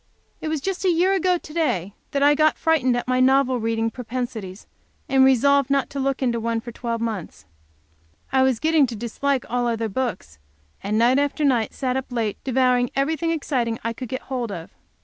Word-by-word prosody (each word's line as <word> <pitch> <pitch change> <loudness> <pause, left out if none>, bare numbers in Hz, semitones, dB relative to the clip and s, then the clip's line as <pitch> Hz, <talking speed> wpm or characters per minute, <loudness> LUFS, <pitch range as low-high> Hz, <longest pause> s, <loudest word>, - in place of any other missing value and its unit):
It 310 - -3
is 310 -3 -2
just 385 +4 -3
a 375 - +3
year 355 +3 +3
ago 370 -2 +2
to 310 - -12
day 200 - -1 0.2
that 280 0 0
I 290 +1 +6
got 310 +1 +3
frightened 260 -7 +2
at 245 - -4
my 255 0 +1
novel 260 -1 +3
reading 225 0 -1
propensities, 230 -5 -5 0.4
and 265 -1 +4
resolved 275 +1 +4
not 275 -1 +1
to 280 - -4
look 275 0 -1
into 235 -2 +1
one 230 0 -1
for 235 +1 -8
twelve 230 0 -4
months. 195 - -5 0.9
I 265 - +3
was 260 -3 +2
getting 315 -2 +3
to 235 - -6
dislike 245 +4 -2
all 245 0 0
other 225 -1 -1
books, 205 - -4 0.4
and 205 +2 -1
night 245 +4 +4
after 285 +1 0
night 245 -5 +1
sat 255 -1 -1
up 265 -1 -5
late, 225 -4 -2
devouring 250 -1 +2
everything 315 +4 0
exciting 255 -8 -1
I 230 +1 -2
could 250 0 -7
get 260 - -4
hold 245 -4 -4
of. 170 -4 -7
255 Hz, 200 wpm, -23 LUFS, 230-280 Hz, 0.9 s, I